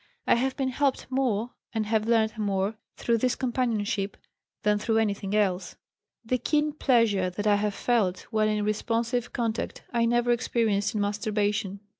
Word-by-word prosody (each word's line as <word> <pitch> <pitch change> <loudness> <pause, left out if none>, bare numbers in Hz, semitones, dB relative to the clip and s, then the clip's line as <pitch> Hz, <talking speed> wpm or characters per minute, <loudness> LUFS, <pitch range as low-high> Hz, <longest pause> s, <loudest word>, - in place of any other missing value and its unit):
I - - +4
have 260 +2 +1
been 265 -2 0
helped 270 +1 0
more, 245 -3 0 0.2
and 220 -1 0
have 215 0 0
learned 225 -1 +2
more, 200 -1 0 0.2
through 230 -1 +1
this 250 +1 +1
companionship, 225 -6 -1 0.5
than 210 0 +3
through 225 +1 +1
anything 205 -2 0
else. 190 -3 0 0.5
The 250 +2 0
keen 300 +2 +1
pleasure 230 -10 +2
that 205 +4 -5
I 205 -1 +4
have 205 -1 -1
felt 205 -7 +1
when 215 -1 +2
in 210 -1 0
responsive 230 +3 -1
contact 230 -2 -3
I 235 -1 +3
never 240 +1 +2
experienced 225 -4 +1
in 210 - +1
masturbation. 205 -1 -1
220 Hz, 160 wpm, -27 LUFS, 205-240 Hz, 0.5 s, I